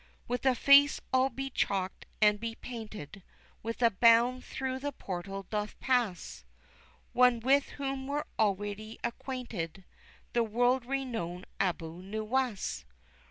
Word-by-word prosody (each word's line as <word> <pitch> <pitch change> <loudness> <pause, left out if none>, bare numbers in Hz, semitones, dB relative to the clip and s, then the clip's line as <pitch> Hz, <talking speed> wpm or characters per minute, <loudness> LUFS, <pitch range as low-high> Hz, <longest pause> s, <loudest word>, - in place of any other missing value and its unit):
With 245 +2 -1
a 260 - +5
face 280 +3 +6
all 260 +1 +4
be 270 +2 -5
chalked 190 -5 -1 0.2
and 210 0 +5
be 230 0 -4
painted, 215 - -8 0.4
with 230 +2 -3
a 230 - +6
bound 235 +4 +5
through 260 0 -3
the 285 +2 -3
portal 195 -4 -5
doth 210 -1 -3
pass 240 -9 0 0.7
One 250 -1 +5
with 270 +4 +3
whom 270 -1 -3
we're 290 +1 -1
already 205 +1 -1
acquainted, 235 - -4 0.5
the 240 - +3
world 245 +3 +2
renowned 230 -10 -3
Abu 170 -2 -2
Nuwas! 215 +3 -2
230 Hz, 125 wpm, -31 LUFS, 205-260 Hz, 0.7 s, face